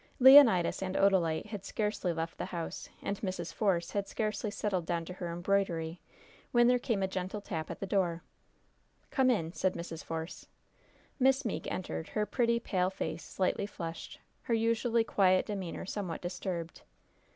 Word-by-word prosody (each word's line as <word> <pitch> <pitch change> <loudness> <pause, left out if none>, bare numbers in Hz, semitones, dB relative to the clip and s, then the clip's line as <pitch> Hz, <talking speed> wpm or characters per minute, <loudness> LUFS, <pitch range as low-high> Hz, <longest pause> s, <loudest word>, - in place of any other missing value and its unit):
Leonidas 255 -11 +8
and 190 0 -3
Odalite 175 -5 +3
had 210 -2 -7
scarcely 210 -4 -1
left 165 0 -4
the - - -2
house, 170 -2 -5
and 200 - -2
Mrs. 185 -4 -4
Force 180 -5 +1
had 200 -1 -2
scarcely 215 0 -2
settled 200 -4 -2
down 170 -1 -1
to 180 - -7
her 175 -2 -5
embroidery, 175 -2 0 0.5
when 240 0 +5
there 250 +1 +4
came 230 -6 -1
a - - +2
gentle 190 +2 -4
tap 160 -5 -5
at - - -6
the - - -3
door. 180 -4 0 0.9
"Come 265 -2 +3
in," 170 -9 0
said 185 -1 0
Mrs. 165 -1 -6
Force. 165 +1 -6 0.7
Miss 265 +1 +3
Meeke 225 - -3
entered, 175 -3 -4
her 210 -1 0
pretty, 235 +2 +1
pale 185 -5 0
face 165 -4 -4
slightly 190 +3 -1
flushed, 165 -4 -7 0.2
her 230 - 0
usually 230 +1 +2
quiet 185 -4 +3
demeanor 190 -5 -4
somewhat 185 -4 -4
disturbed. 175 -2 -4
190 Hz, 160 wpm, -31 LUFS, 170-215 Hz, 0.9 s, Leonidas